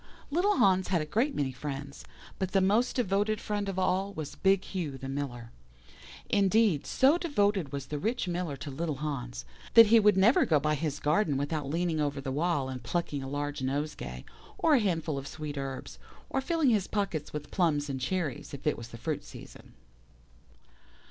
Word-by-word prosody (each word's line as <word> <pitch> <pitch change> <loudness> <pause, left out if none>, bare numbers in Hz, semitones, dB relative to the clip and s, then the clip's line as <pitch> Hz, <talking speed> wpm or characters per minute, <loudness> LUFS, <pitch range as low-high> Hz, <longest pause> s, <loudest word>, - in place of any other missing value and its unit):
"Little 380 +6 +2
Hans 190 -1 +4
had 180 -2 +1
a 155 - -2
great 235 - 0
many 135 -2 0
friends, 140 +1 -6 0.4
but 190 -1 -2
the 195 - +5
most 210 +6 +2
devoted 210 -2 +1
friend 205 -1 -2
of 190 - -4
all 190 +2 +1
was 155 -2 -5
big 195 0 +2
Hugh 160 -8 -4
the 135 - -7
Miller. 130 -4 -5 0.8
Indeed, 200 -5 +3
so 285 +6 +4
devoted 205 - +1
was 140 -1 -4
the 150 - -4
rich 225 - -1
Miller 175 -5 -2
to 145 - -7
little 155 +2 -2
Hans, 135 -4 -4 0.3
that 230 -1 +11
he 230 - +9
would 210 -2 +4
never 210 +7 +5
go 155 -3 +3
by 150 +1 +1
his 150 -1 -2
garden 150 -1 +2
without 145 0 -2
leaning 165 0 0
over 145 -1 -1
the 135 -1 -4
wall 150 -1 0
and 130 -1 -5
plucking 150 0 -2
a 135 - -6
large 145 0 -3
nosegay, 135 - -3 0.3
or 320 - +3
a 275 - +6
handful 165 -8 -1
of 135 - -8
sweet 150 -1 -6
herbs, 135 -1 -6 0.3
or 270 - 0
filling 315 -2 +2
his 205 -4 +1
pockets 195 -8 -2
with 150 -1 -6
plums 155 -6 +1
and 135 -2 -4
cherries 155 -4 -2
if 140 - -12
it 150 - +1
was 115 - -8
the 115 - -10
fruit - - -3
season. - - -12
155 Hz, 190 wpm, -29 LUFS, 140-200 Hz, 0.8 s, that